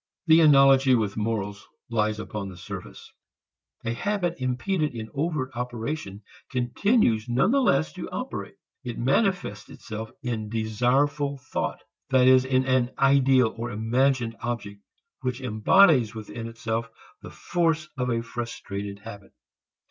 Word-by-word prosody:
The 160 0 +6
analogy 135 -3 +6
with 105 -4 -1
morals 105 -2 -3 0.2
lies 110 -1 0
upon 105 -2 -5
the 90 - -11
surface. 90 - -9 0.7
A 115 - -1
habit 190 - -1
impeded 145 +4 -1
in 110 -1 -6
overt 145 -3 -2
operation 120 -3 -5 0.3
continues 125 - +1
nonetheless 135 - +2
to - - -7
operate. - - -5 0.3
It 120 -2 -5
manifests 135 - 0
itself 110 0 -7
in 110 -4 -3
desireful 130 +6 0
thought, 130 - -4 0.3
that 130 -1 +4
is 130 0 +6
in 130 0 +1
an 130 -2 +2
ideal 135 -3 +4
or 115 +1 -4
imagined 120 +2 +1
object 110 -4 -5 0.4
which 130 -1 -2
embodies 125 - +4
within 110 +1 -7
itself 115 0 -3 0.3
the - - -9
force 165 -3 -1
of 125 -2 -2
a 115 -1 0
frustrated 105 -4 -6
habit. 100 -3 -11
125 Hz, 125 wpm, -26 LUFS, 110-135 Hz, 0.7 s, The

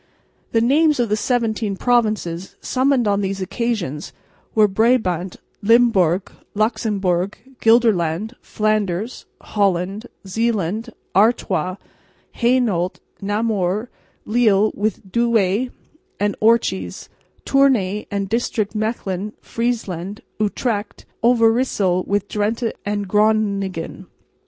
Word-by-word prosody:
The 225 - +3
names 295 +4 +3
of 235 -3 +1
the 210 - +2
seventeen 220 -3 -1
provinces 215 -8 0
summoned 260 -2 +1
on 200 0 +2
these 195 0 -2
occasions 185 - -3 0.4
were 215 -1 +6
Brabant, 195 -5 +1 0.3
Limburg, 200 -5 +3 0.2
Luxemburg, 205 -4 0 0.2
Gelderland, 220 -4 +3
Flanders, 215 0 -1
Holland, 200 +2 -1 0.2
Zeeland, 220 +1 -1 0.3
Artois, 190 -4 +2 0.6
Hainault, 235 -8 +1 0.3
Namur, 205 0 -1 0.3
Lille 215 -2 +3
with 205 -2 -3
Douay 235 0 +2 0.5
and 205 0 0
Orchies, 215 - +1 0.4
Tournay 230 -8 +2
and 200 -1 -2
district, 220 -1 -1
Mechlin, 210 -2 -3
Friesland, 210 -5 -3 0.2
Utrecht, 210 0 -2 0.2
Overyssel 225 -6 +3
with 205 0 0
Drente 220 +3 -1
and 205 -1 -2
Groningen. 200 -4 0
210 Hz, 90 wpm, -20 LUFS, 190-230 Hz, 0.6 s, were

